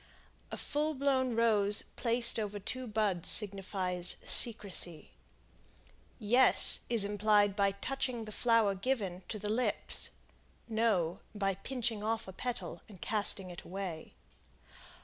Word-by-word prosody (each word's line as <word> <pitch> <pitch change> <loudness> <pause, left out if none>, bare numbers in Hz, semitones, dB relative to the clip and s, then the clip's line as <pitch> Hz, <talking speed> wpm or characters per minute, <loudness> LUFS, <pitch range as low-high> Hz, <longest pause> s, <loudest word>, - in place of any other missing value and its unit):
A - - -6
full 305 +1 -3
blown 260 -3 -1
rose 210 -3 +2
placed 235 -1 +2
over 210 -1 -5
two 255 +5 -6
buds 210 -5 -2
signifies 185 -3 +1
"Secrecy." 185 - +3 1.1
"Yes" 245 +5 +5
is 230 -4 +7
implied 205 0 +1
by 200 -1 0
touching 250 +2 -4
the 215 - -10
flower 230 -2 +1
given 195 -4 -3
to 220 - -5
the 210 0 -6
lips. 225 +4 -2 0.6
"No" 220 -7 -1 0.2
by 195 -1 -1
pinching 230 +1 -4
off 220 0 -3
a 190 - -9
petal 245 +5 -6
and 195 -4 -14
casting 200 -3 -2
it 175 - -10
away. 185 -4 -8
210 Hz, 125 wpm, -31 LUFS, 195-235 Hz, 1.1 s, is